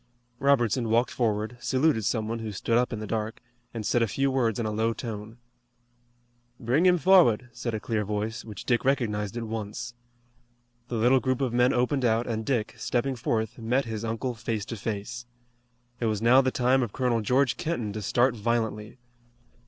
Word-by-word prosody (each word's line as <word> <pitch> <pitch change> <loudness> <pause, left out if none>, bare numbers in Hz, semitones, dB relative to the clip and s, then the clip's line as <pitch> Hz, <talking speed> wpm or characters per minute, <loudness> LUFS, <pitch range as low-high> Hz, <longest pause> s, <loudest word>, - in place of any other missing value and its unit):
Robertson 125 -4 +2
walked 115 +3 +2
forward, 110 0 -1
saluted 130 -5 +1
some 110 -1 0
one 115 +1 -3
who 110 -1 -5
stood 110 +3 -1
up 125 +1 +2
in 115 - -3
the 110 - -5
dark, 110 +1 -3 0.3
and 110 -2 -5
said 120 - +2
a 115 - +3
few 135 +6 0
words 120 -5 +1
in 115 - -2
a 110 - -1
low 110 +2 0
tone. 110 -1 -7 1.2
"Bring 135 +10 +2
him 180 0 +5
forward," 150 - +4
said 120 -2 -3
a - - -2
clear 110 0 -1
voice, 105 +2 -3
which 105 -4 -9
Dick 120 -2 +1
recognized 110 -6 0
at 120 - -3
once. 115 +2 -5 0.9
The 125 - -4
little 125 +4 +4
group 130 -1 -1
of 130 -4 -1
men 125 +1 +4
opened 125 +2 +1
out 115 0 +2
and 110 -1 -2
Dick, 110 -3 -1
stepping 130 +2 -1
forth, 110 -1 -2
met 125 +4 0
his 110 -1 -5
uncle 115 +3 -2
face 110 -2 -3
to 115 - -5
face. 115 +3 -5 0.7
It 120 - -1
was 105 -2 0
now 120 +4 +6
the 130 - +1
time 130 0 +2
of 120 -5 -3
Colonel 125 -3 +1
George 125 +3 +2
Kenton 155 - -3
to 110 - -4
start 120 +5 +2
violently. 110 0 -2
115 Hz, 190 wpm, -27 LUFS, 110-125 Hz, 1.2 s, now